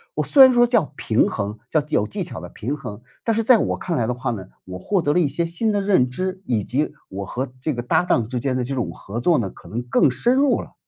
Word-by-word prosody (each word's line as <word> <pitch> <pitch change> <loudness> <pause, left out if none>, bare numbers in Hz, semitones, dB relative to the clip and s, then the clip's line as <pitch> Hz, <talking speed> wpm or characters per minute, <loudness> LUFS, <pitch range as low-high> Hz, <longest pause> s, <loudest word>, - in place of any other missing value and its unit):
我 - - 0
虽 275 -3 +7
然 260 - +8
说 240 0 +5
叫 230 - +1
平 110 - +2
衡， 105 +1 -4
叫 155 - +2
有 105 - +1
技 105 - -4
巧 - - -7
的 - - -8
平 130 +7 -4
衡， 105 -6 -8 0.2
但 225 - +1
是 225 - +1
在 235 +1 +6
我 - - -1
看 170 -3 -3
来 115 - +1
的 125 - -1
话 125 0 -3
呢， 95 -5 -5 0.2
我 90 0 -7
获 195 - 0
得 145 -2 +1
了 180 - +3
一 165 - +3
些 160 +5 -2
新 175 +7 -1
的 205 - +1
认 185 -11 +3
知， 185 +7 -4
以 115 -5 0
及 145 +8 -1 0.2
我 100 +1 -5
和 125 +6 -4
这 155 +1 -1
个 120 - -3
搭 120 - +2
档 120 -10 +1
之 125 +1 -3
间 130 0 -1
的 125 - -1
这 135 +3 -4
种 125 - -2
合 105 +4 -7
作 165 +6 +3
呢， 100 -5 -2
可 85 - -15
能 115 +6 -3
更 125 +2 +3
深 240 - +1
入 280 0 +3
了。 - - -13
135 Hz, 305 characters per minute, -22 LUFS, 115-185 Hz, 0.2 s, 然